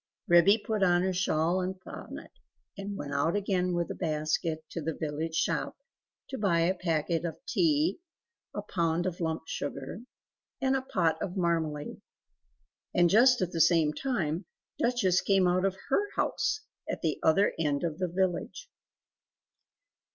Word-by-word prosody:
Ribby 175 +4 +6
put 215 -1 -3
on 175 -1 +4
her 190 0 0
shawl 175 0 +1
and 185 +1 -3
bonnet - - -9 0.4
and 200 0 -5
went 145 0 -5
out 150 +5 +1
again 185 -3 0
with 170 0 -1
a - - -2
basket, 155 0 -1
to 165 - -4
the 160 0 -3
village 160 +1 -3
shop - - -1 0.5
to 265 - -5
buy 175 -5 +2
a 175 +3 +3
packet 165 -2 -1
of 170 -2 -4
tea, 315 +1 +2 0.6
a 205 - -3
pound 170 -3 0
of 180 -2 -3
lump 160 -2 -2
sugar, 140 +4 -5 0.6
and 265 0 +2
a 265 - 0
pot 180 -10 0
of 185 +1 -4
marmalade. 160 -4 -1 0.9
And 175 -1 +4
just 245 +1 +6
at 180 - -3
the 165 - 0
same 160 -2 +4
time, 185 - -2 0.3
Duchess 235 -7 +2
came 195 -2 +3
out 180 +1 +2
of 190 -1 0
HER 405 +9 +2
house, 435 - 0 0.3
at - - -4
the 155 -3 0
other 195 +6 +3
end 145 -2 0
of 165 -1 -2
the 185 - 0
village. 190 - -2
175 Hz, 160 wpm, -29 LUFS, 160-195 Hz, 0.9 s, Ribby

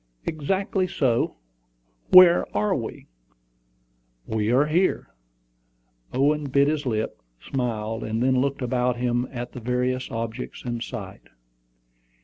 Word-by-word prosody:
"Exactly 185 +5 -1
so. 125 -9 0 0.7
Where 180 -1 +8
are 105 0 +1
we?" - - -5 1.2
"We 110 0 -1
are 135 +4 +4
here." 170 +5 0 1.0
Owen 145 +3 +1
bit 140 +1 +3
his 150 -2 -1
lip, 110 - -2 0.2
smiled, 115 - -3
and 110 +2 -1
then 130 0 +3
looked 140 0 -1
about 125 0 0
him 120 0 0
at 120 -1 -6
the - - -8
various 125 +2 -1
objects 115 +3 -5
in 120 -1 -3
sight. 105 -7 -8
125 Hz, 120 wpm, -24 LUFS, 115-140 Hz, 1.2 s, Where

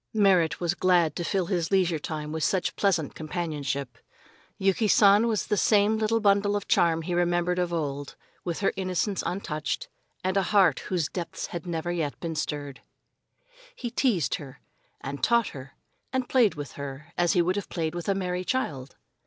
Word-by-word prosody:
Merrit 180 -7 +3
was 175 -1 0
glad 175 -5 +3
to 175 - -3
fill 190 +1 0
his 170 -3 -1
leisure 180 -5 +2
time 150 0 -5
in 160 - -3
such 185 +3 0
pleasant 175 -7 +1
companionship. 145 -6 -4 0.6
Yuki 195 +3 +2
San 205 +2 +6
was 220 -3 0
the 210 - 0
same 210 +1 +4
little 220 +1 +2
bundle 205 -1 +3
of 205 - -3
charm 165 -1 +3
he 175 +2 -3
remembered 175 0 +1
of 175 -1 0
old, 145 -4 -3 0.3
with 175 +1 -3
her 195 - +2
innocence 190 +1 -1
untouched, 155 -5 -3 0.3
and 185 +1 0
a - - +4
heart 195 -2 +3
whose 175 -5 -1
depths 175 -1 -5
had 175 0 -5
never 170 0 -2
yet 160 -5 -2
been 165 -1 -3
stirred. 145 -3 -4 0.9
He 240 -2 -5
teased 210 - +1
her, 135 0 -11 0.4
and 140 +1 -6
taught 235 -1 +3
her, 130 -1 -10 0.4
and 260 -1 -1
played 240 -6 +3
with 145 -2 -6
her, 140 +4 -8
as 175 -1 +2
he 175 - +4
would 180 +2 0
have 205 - -4
played 160 -2 -2
with 175 +2 -4
a 195 - +2
merry 180 -1 -2
child. 145 - -2
175 Hz, 180 wpm, -27 LUFS, 155-195 Hz, 0.9 s, San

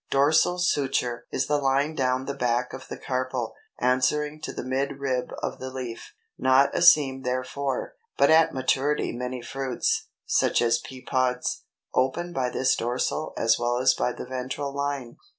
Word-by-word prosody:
DORSAL 150 +6 +3
SUTURE 135 -8 0
is 130 - 0
the 150 0 +1
line 140 +2 +1
down 130 -2 0
the 140 - -3
back 125 -2 0
of 130 - -8
the - - -6
carpel, 130 -2 -2 0.3
answering 150 +4 +1
to - - -4
the - - -6
midrib 135 -1 -1
of - - -3
the 130 - -5
leaf, 125 -3 -7 0.2
not 130 +1 +4
a - - +1
seam 145 -6 +6
therefore; 130 - -2 0.2
but - - +5
at 160 0 +6
maturity 135 +3 0
many 125 0 -4
fruits, 135 -2 -1 0.2
such - - +2
as 120 0 +3
pea 130 +1 -10
pods, 125 -1 -1 0.3
open 170 +7 0
by 130 -5 0
this 130 +1 +2
dorsal 125 +6 -1
as 115 0 +3
well 120 0 0
as 130 +1 +4
by 125 - 0
the - - -7
ventral 130 +2 -4
line. 140 -4 -3
130 Hz, 165 wpm, -26 LUFS, 125-140 Hz, 0.3 s, seam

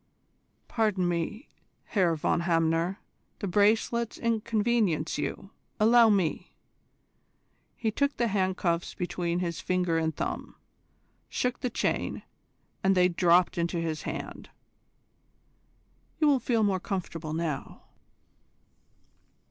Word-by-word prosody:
Pardon 210 -6 +1
me, 175 - -3 0.4
Herr 180 -6 +2
von 155 - 0
Hamner: 165 +2 +1 0.4
the 200 - -4
bracelets 220 +4 +2
inconvenience 220 -7 0
you. 195 - -4 0.3
Allow 230 +1 +6
me." 190 -7 0 1.2
He 225 -2 -1
took 280 +5 0
the 235 - +2
handcuffs 185 -3 0
between 175 -1 -2
his 170 -2 -3
finger 180 -3 +1
and 160 0 -1
thumb, - - -4 0.7
shook 250 0 -1
the 250 - -1
chain, - - -2 0.6
and 195 0 +3
they 180 0 +5
dropped 175 0 +3
into 170 +1 -1
his 160 -2 -2
hand. - - -6 1.7
"You 315 - +2
will 280 -3 +4
feel 230 -3 +1
more 195 -2 +2
comfortable 170 -4 -4
now." 160 -4 -4
185 Hz, 110 wpm, -28 LUFS, 170-220 Hz, 1.7 s, Allow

